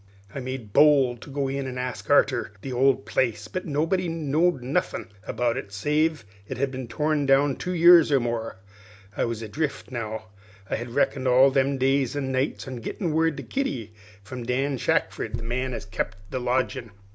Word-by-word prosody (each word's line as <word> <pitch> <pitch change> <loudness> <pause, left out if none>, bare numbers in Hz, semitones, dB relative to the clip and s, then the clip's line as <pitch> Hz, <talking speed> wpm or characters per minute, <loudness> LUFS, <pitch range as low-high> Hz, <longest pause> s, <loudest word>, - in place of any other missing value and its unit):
"I - - -4
made 130 -5 -6
bold 135 -5 +5
to - - -11
go 140 0 -1
in 135 0 -3
an' 125 -1 -5
ask 125 -2 -5
arter - - +3
the 135 - -4
old 135 +1 +3
place, 110 -4 0
but 185 +10 -5
nobody 165 +5 0
knowed 160 -2 +1
nothin' 130 +4 -2 0.2
about 120 0 0
it, 100 -6 -6
save 150 +8 +1
as - - -22 0.3
it - - -8
had 135 +1 0
been 130 -2 -6
torn 150 +4 0
down 135 0 +4
two 180 0 -4
years 170 -2 +7
or 140 - +5
more. 115 -3 -3 0.6
I - - +1
was 115 -1 -4
adrift 140 +6 -3
now, 110 -2 -5 0.4
for - - -6
I - - +1
had 120 +1 -6
reckoned 140 -2 +1
all 130 +2 +6
them 135 0 +1
days 135 0 +1
and 135 -2 -2
nights 130 +1 -1
on 130 -3 -6
gittin' 165 - -3
word 160 -1 +1
of - - -9
Kitty 125 - -2 0.3
from 125 +5 -7
Dan 130 +3 -1
Shackford, - - 0
the - - -6
man 130 +3 -2
as 120 - -5
kept 100 -1 -3
the 130 - -2
lodgin'. 125 0 -1
130 Hz, 195 wpm, -25 LUFS, 120-145 Hz, 0.6 s, years